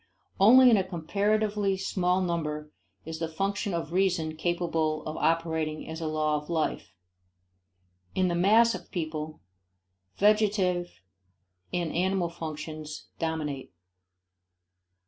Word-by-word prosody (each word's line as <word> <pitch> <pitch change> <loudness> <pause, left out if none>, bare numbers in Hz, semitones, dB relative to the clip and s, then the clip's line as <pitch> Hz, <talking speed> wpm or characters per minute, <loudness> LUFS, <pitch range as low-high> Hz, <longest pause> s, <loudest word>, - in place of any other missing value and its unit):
Only 250 +5 +8
in 220 - +6
a 190 - +2
comparatively 200 +3 0
small 185 -1 0
number 150 -4 -2 0.3
is 160 0 -6
the 165 - -1
function 195 +5 -2
of 165 0 -4
reason 180 -4 +1
capable 165 -2 -1
of 155 - -4
operating 160 -1 0
as 160 +1 -6
a 160 - -2
law 155 -1 +1
of 150 - -17
life. 155 - -2 1.2
In 185 -1 +2
the 175 - 0
mass 215 +7 +5
of 180 -2 -8
people, 155 -2 -4 0.8
vegetative 200 -4 +2 0.8
and 175 -3 -1
animal 185 0 +1
functions 155 -2 -7
dominate. 150 - -3
170 Hz, 115 wpm, -28 LUFS, 155-190 Hz, 1.2 s, Only